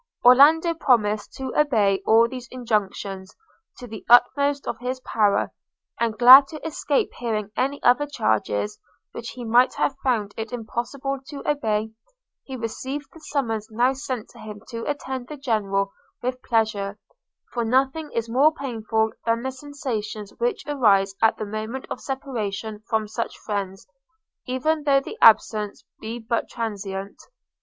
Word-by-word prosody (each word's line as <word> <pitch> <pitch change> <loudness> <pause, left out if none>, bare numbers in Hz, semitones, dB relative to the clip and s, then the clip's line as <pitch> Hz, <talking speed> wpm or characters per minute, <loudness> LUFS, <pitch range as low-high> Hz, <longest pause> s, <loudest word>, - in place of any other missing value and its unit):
Orlando 305 +7 +7
promised 215 -9 +1
to 265 -1 -5
obey 215 -10 +2
all 230 +1 +6
these 250 0 -8
injunctions, 200 -5 -3 0.4
to 250 - -9
the 220 -3 -9
utmost 280 +4 +4
of - - -3
his 255 +1 -3
power; 210 -5 +1 0.5
and 230 -2 0
glad 260 +3 +10
to 310 0 -9
escape 295 -2 0
hearing 215 -4 -2
any 275 +2 -1
other 250 +4 +4
charges, 105 - -1 0.3
which 235 - -7
he 245 -1 -8
might 240 +3 +4
have 270 - 0
found 220 -6 0
it 225 -1 -5
impossible 245 +4 -4
to 285 -2 -8
obey, 220 -7 0 0.5
he 265 - -8
received 265 +5 -5
the 325 - -13
summons 230 -9 -2
now 240 +4 +2
sent 255 -4 -5
to - - -16
him 210 -1 -9
to 230 -2 -5
attend 265 -3 -4
the 300 - -8
General 200 -6 -1 0.3
with 255 +1 -2
pleasure; 215 -3 0 0.6
for 240 - -1
nothing 270 +6 +1
is 230 0 -2
more 265 +7 +4
painful 225 -6 -1 0.2
than 230 +1 +1
the 265 - -2
sensations 240 -7 -5
which 475 -3 -1
arise 205 -9 +3
at 225 - +4
the 215 - -4
moment 215 +5 -5
of - - -4
separation 220 -6 -4
from 220 -2 0
such 230 +2 -4
friends, 195 -2 -4 0.6
even 300 +5 0
though 280 -1 +4
the 275 - -9
absence 215 -2 +4 0.2
be 225 +2 -5
but 230 0 -2
transient. 200 -4 -5
235 Hz, 150 wpm, -24 LUFS, 215-270 Hz, 0.6 s, glad